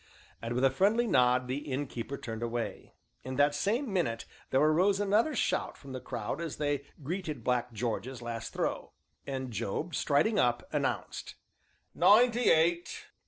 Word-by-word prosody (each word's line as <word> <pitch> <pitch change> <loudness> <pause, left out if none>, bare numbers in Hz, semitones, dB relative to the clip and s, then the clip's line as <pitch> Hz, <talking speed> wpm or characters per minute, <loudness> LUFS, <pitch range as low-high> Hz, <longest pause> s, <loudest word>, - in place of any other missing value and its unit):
And, 115 +1 -3
with 125 - 0
a 135 - +4
friendly 210 - +3
nod, 125 - +3
the 130 +3 -2
Innkeeper 135 -1 -3
turned 110 -1 -6
away. 120 0 -4 0.3
In 130 +1 -5
that 145 +2 +4
same 215 - -1
minute 115 -12 0 0.2
there 130 - +3
arose 175 +7 +3
another 210 +9 +2
shout - - 0
from 135 - -11
the 130 -1 -5
crowd 120 +5 -4
as 165 -3 -4
they 145 -2 -1 0.2
greeted 155 - -4
Black 125 0 0
George's 120 +2 -3
last 115 -1 -5
throw, - - -3 0.3
and 130 -2 -4
Job, 150 - -3
striding 200 +9 +2
up, 120 0 +1
announced: - - -2 0.6
"Ninety 240 +2 +5
eight!" 170 +2 +1
140 Hz, 155 wpm, -30 LUFS, 125-180 Hz, 0.6 s, Ninety